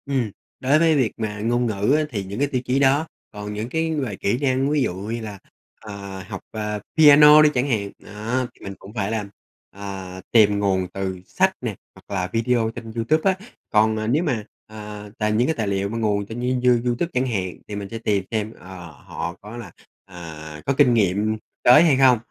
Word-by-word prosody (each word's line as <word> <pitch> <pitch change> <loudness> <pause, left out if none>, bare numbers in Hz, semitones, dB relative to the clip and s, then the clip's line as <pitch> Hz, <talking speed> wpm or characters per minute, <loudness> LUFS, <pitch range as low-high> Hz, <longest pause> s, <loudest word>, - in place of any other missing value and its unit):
Ừm, 130 -6 -1 0.3
đối 140 +4 +3
với 165 -1 +4
việc 125 -7 +2
mà 105 -2 -3
ngôn 120 +3 +1
ngữ 105 +2 +1
á 155 - +1
thì 105 -8 -3
những 100 +4 -6
cái 145 - +2
tiêu 130 -3 -2
chí 130 +2 +1
đó. 140 +3 +3 0.2
Còn 105 0 -6
những 110 +3 -4
cái 160 +2 -1
về 130 -9 -2
kỹ 100 +4 0
năng, 135 0 +1
ví 150 -1 +2
dụ 105 - -1
như 110 +5 -4
là, 105 -3 -7 0.4
à, 100 -3 -8
học, - - -6
à, 105 -1 -3 0.2
piano 150 0 +9
đi 155 - +6
chẳng 125 +1 0
hạn, 100 -5 -1
đó, 115 +5 -3
thì - - -20
mình 100 - -5
cũng 100 +2 -12
phải 105 -2 -2
làm, 105 -3 -3 0.4
à, 95 -2 -7
tìm 105 -3 +5
nguồn 95 -2 +1
từ 95 -1 -3
sách - - +1
nè - - -3 0.2
hoặc 100 - -8
là 90 -1 -1
video 115 0 +1
trên 115 -1 -7
Youtube 155 +11 +2
á. 190 - -4 0.3
Còn, 110 0 +3
ờ, 110 0 -2
nếu 145 +9 +2
mà, 125 -10 -1 0.2
ờ, 105 -1 -9
tài 105 -1 0
những 115 +4 +2
cái 160 - 0
tài 110 -3 -2
liệu 100 0 -1
mà 115 - -4
nguồn 105 -2 0
trên 110 +4 -7 0.2
You 125 0 +5
Youtube 125 +8 0
chẳng 130 +1 +1
hạn 95 -6 -2
thì 105 - -6
mình 100 -1 -5
sẽ 115 - -5
tìm 105 -4 0
xem, 110 0 -2
ờ, 90 -2 -10
họ 80 +3 -6
có 105 +3 -9
là, 120 - -8 0.3
à, 80 -4 -9
có 140 - +1
kinh 125 - +5
nghiệm 105 0 +1 0.3
tới 125 +6 +8
hay 160 -5 +4
hông? 130 -2 +6
110 Hz, 220 wpm, -22 LUFS, 100-130 Hz, 0.4 s, piano